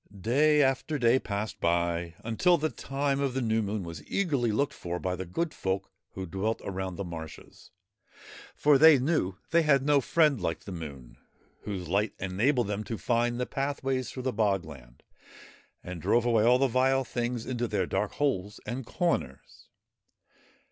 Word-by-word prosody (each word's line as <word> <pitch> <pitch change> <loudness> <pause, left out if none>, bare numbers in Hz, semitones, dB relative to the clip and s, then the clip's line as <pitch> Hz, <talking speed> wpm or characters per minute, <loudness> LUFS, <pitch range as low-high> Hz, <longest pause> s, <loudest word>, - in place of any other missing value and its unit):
Day 145 +8 +4
after 135 +3 0
day 125 0 +4
passed 105 -1 -4
by 85 0 0
until 170 +11 +3
the 155 -1 -1
time 140 +3 -2
of 135 -2 -1
the - - +1
New 110 0 +1
Moon 105 -1 -3
was 85 -3 -8
eagerly 140 - 0
looked 140 +7 0
for 85 0 -4
by 90 0 -2
the 90 0 -6
good 165 - -2
folk 95 0 -3 0.2
who 95 - -5
dwelt 95 +6 -2
around 95 -1 -4
the 100 - -4
marshes, 80 -3 -9 0.9
for 145 -2 +4
they 160 -2 +8
knew 130 - 0 0.2
they 170 +1 +5
had 140 -4 +3
no 145 -1 +4
friend 150 - +2
like 85 -1 -2
the 100 - -9
Moon, 70 -8 -8 0.5
whose 95 -4 -4
light 100 +5 0
enabled 115 +7 +1
them 105 +1 -3
to 115 +1 -5
find 120 +1 0
the 125 - 0
pathways 135 -2 -2
through 130 - -7
the 130 -1 -1
bog 100 -5 +1
land, 65 -6 -13 0.8
and 90 -2 -7
drove 120 +9 +2
away 115 -3 +3
all 120 +2 +5
the 135 - +3
vile 130 +2 +2
things 120 -1 -3
into 120 -2 -2
their 100 -4 0
dark 105 +3 -2
holes 105 -9 -1
and 120 +3 -5
corners. 70 - -3
115 Hz, 175 wpm, -28 LUFS, 95-135 Hz, 0.9 s, they